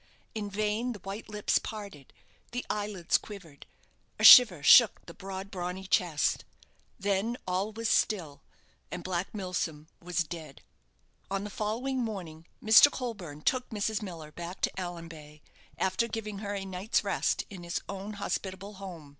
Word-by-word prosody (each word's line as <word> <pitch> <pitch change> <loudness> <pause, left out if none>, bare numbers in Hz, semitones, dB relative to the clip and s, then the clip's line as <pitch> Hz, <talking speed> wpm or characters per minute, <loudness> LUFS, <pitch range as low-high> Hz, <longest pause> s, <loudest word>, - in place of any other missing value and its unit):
In 210 -2 -4
vain 215 +4 -1
the 210 - -10
white 195 +4 -7
lips 210 -1 +1
parted, 200 -11 -8 0.4
the 245 - -3
eyelids 205 -4 0
quivered, 170 -9 -12 0.5
a - - -4
shiver 195 - +10
shook 230 - +7
the - - -10
broad, 195 0 -7
brawny 180 +1 -4
chest 175 -5 +1 0.5
then 200 +4 0
all 185 +4 -1
was 225 +1 -3
still, 170 -11 +1 0.5
and - - -6
Black 185 0 -2
Milsom 175 -6 -4
was 175 0 -1
dead! 155 -3 -9 0.7
On 195 0 -2
the 210 - -6
following 235 +7 -2
morning 180 -8 -5 0.2
Mr. 220 +6 +8
Colburne 195 - -6
took 255 -1 0
Mrs. 215 0 -1
Miller 165 -6 -8
back 175 +3 -8
to - - +1
Allanbay, 165 -4 -8 0.4
after 190 +5 +1
giving 215 -3 -5
her 205 -1 -4
a 195 -1 -4
night's 190 +3 -1
rest - - 0
in 190 -3 -8
his 170 0 -3
own 200 +2 -6
hospitable 200 0 -4
home. 175 -7 -9
195 Hz, 150 wpm, -29 LUFS, 175-210 Hz, 0.7 s, shiver